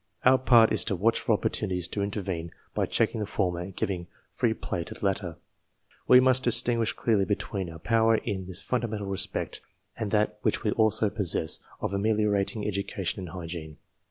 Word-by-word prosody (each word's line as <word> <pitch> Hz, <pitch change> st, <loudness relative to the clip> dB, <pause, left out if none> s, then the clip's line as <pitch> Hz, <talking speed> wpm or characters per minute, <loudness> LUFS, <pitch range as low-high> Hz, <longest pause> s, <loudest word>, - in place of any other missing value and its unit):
Our 130 Hz, +1 st, +6 dB
part 120 Hz, -3 st, +5 dB
is -, -, +2 dB
to 100 Hz, -, 0 dB
watch 110 Hz, +6 st, +2 dB
for 115 Hz, -, +1 dB
opportunities 95 Hz, -4 st, -1 dB
to 100 Hz, -, -3 dB
intervene 95 Hz, -5 st, -3 dB, 0.2 s
by -, -, 0 dB
checking -, -, +1 dB
the 105 Hz, -, -3 dB
former 90 Hz, -5 st, -1 dB
and 90 Hz, +1 st, -7 dB
giving 90 Hz, -3 st, -3 dB, 0.3 s
free 115 Hz, -2 st, +1 dB
play 85 Hz, -, -4 dB
to -, -, -8 dB
the -, -, -5 dB
latter. 95 Hz, -4 st, -1 dB, 0.7 s
We 125 Hz, -, +8 dB
must 130 Hz, 0 st, +4 dB
distinguish 120 Hz, -1 st, +3 dB
clearly 105 Hz, -4 st, +1 dB
between 100 Hz, -2 st, -3 dB
our 80 Hz, -, -9 dB
power 115 Hz, +5 st, +3 dB
in 95 Hz, -4 st, -3 dB
this 95 Hz, +1 st, -3 dB
fundamental 115 Hz, -5 st, -2 dB
respect 95 Hz, 0 st, -2 dB, 0.3 s
and 110 Hz, -3 st, -3 dB
that 105 Hz, 0 st, 0 dB
which -, -, 0 dB
we 105 Hz, -, +1 dB
also 110 Hz, -1 st, +2 dB
possess 90 Hz, -6 st, +2 dB, 0.2 s
of -, -, -2 dB
ameliorating 105 Hz, 0 st, 0 dB
education 100 Hz, -2 st, -3 dB
and 90 Hz, -2 st, -6 dB
hygiene. 85 Hz, -4 st, -7 dB
100 Hz, 180 wpm, -27 LUFS, 95-110 Hz, 0.7 s, We